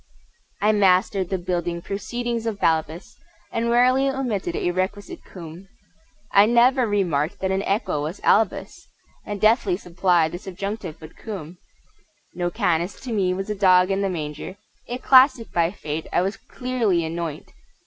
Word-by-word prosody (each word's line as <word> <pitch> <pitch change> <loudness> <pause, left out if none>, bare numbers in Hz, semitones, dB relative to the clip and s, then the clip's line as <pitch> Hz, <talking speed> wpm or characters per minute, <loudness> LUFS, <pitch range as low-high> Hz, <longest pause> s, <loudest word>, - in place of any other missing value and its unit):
I 210 - +4
mastered 190 -2 +2
the 190 - 0
building 175 -1 -2
proceedings 230 +5 -4
of 210 -3 -3
Balbus, 160 +1 -1 0.3
And 230 +1 -1
rarely 255 +3 +4
omitted 230 -10 -2
a 175 - 0
requisite 190 +3 -4
cum; 175 +1 -11 0.6
I 200 +1 +6
never 240 +2 +4
remarked 185 -4 0
that 190 0 -1
an 190 0 0
equa 195 -7 -1
was 155 +6 -5
albus, 215 -2 +1 0.4
And 205 -1 -4
deftly 215 -3 +3
supplied 175 -3 +1
the 175 - -6
subjunctive 195 -2 -6
with 155 0 -12
quum! 180 -6 -8 0.7
No 175 0 -2
canis 175 +2 -1
to 255 - -6
me 190 -4 +1
was 195 +2 -4
a - - +1
dog 185 -1 +4
in 195 +1 0
the 195 - 0
manger 155 +2 -5 0.3
A 245 - -3
classic 260 -2 +5
by 170 -1 +2
Fate 155 -4 -5
I 175 - +2
was 195 +3 -2
clearly 230 -10 -1
anoint! 165 -2 -5
190 Hz, 155 wpm, -23 LUFS, 175-215 Hz, 0.7 s, I